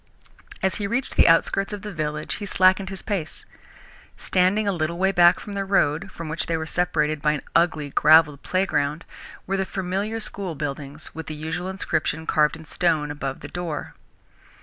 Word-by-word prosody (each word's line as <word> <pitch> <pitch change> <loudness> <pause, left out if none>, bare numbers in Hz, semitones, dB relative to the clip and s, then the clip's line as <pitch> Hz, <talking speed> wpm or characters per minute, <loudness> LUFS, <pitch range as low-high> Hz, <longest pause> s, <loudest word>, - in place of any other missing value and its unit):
As 190 - +1
he 205 - -2
reached 245 +5 -2
the - - +6
outskirts 195 +4 +3
of 205 -1 -6
the 210 -2 -6
village 150 -1 -3
he 205 - -4
slackened 190 +1 +3
his 195 -2 -6
pace. 190 -7 -4 0.7
Standing 190 +3 +2
a - - +3
little 170 -1 -2
way 190 +2 +2
back 175 -1 +5
from 205 - -8
the 200 0 -1
road, 165 -6 +1
from 165 - -7
which 165 +2 -2
they 165 - 0
were 160 - -3
separated 155 -3 0
by 150 0 +2
an 145 - -3
ugly, 155 -4 +2
gravelled 150 -1 +5
playground, 165 -5 0 0.4
were 195 +1 -1
the 190 - +1
familiar 195 +4 -3
school 195 -5 -4
buildings, 145 0 -5
with 160 -2 -7
the 155 - -5
usual 160 +4 -4
inscription 160 -4 -2
carved 150 0 +2
in 160 -1 -12
stone 155 -2 0
above 140 -2 -5
the - - -7
door. 170 -4 -5
170 Hz, 185 wpm, -24 LUFS, 155-190 Hz, 0.7 s, the